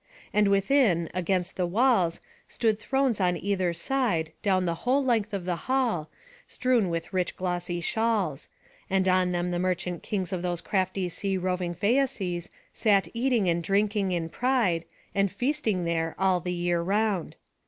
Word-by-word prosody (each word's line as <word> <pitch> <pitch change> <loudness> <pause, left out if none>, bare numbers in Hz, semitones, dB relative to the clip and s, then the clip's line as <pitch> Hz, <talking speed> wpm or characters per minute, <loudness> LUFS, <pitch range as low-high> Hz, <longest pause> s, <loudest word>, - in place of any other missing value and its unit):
And 210 -1 +4
within, 200 - +3
against 185 0 -1
the 180 -2 +1
walls, 200 -4 +2 0.3
stood 220 -3 0
thrones 265 -3 0
on 180 -1 +2
either 185 -1 0
side, 170 -4 -1
down 185 -2 +2
the 170 - 0
whole 265 +3 +2
length 225 -5 +1
of 195 -4 -4
the 180 -1 0
hall, 235 - +1 0.4
strewn 245 -7 +1
with 165 +2 -4
rich 180 -2 0
glossy 175 -1 -2
shawls; 205 -8 0 0.4
and 190 0 +2
on 185 -1 +3
them 175 0 -1
the 175 - -1
merchant 180 -1 -1
kings 190 -3 -3
of 180 - -2
those 175 -1 -2
crafty 185 +1 -1
sea 195 +2 -2
roving 180 -1 -2
Phæaces 200 -4 0 0.2
sat 200 -3 +2
eating 235 -4 +1
and 170 0 +1
drinking 200 +1 +1
in 170 -2 -1
pride, 230 -8 +1 0.3
and 195 -1 +1
feasting 245 - -1
there 165 -1 -1
all 190 -1 +2
the 180 +1 -4
year 175 -1 0
round. 200 -1 0
185 Hz, 160 wpm, -27 LUFS, 175-220 Hz, 0.4 s, And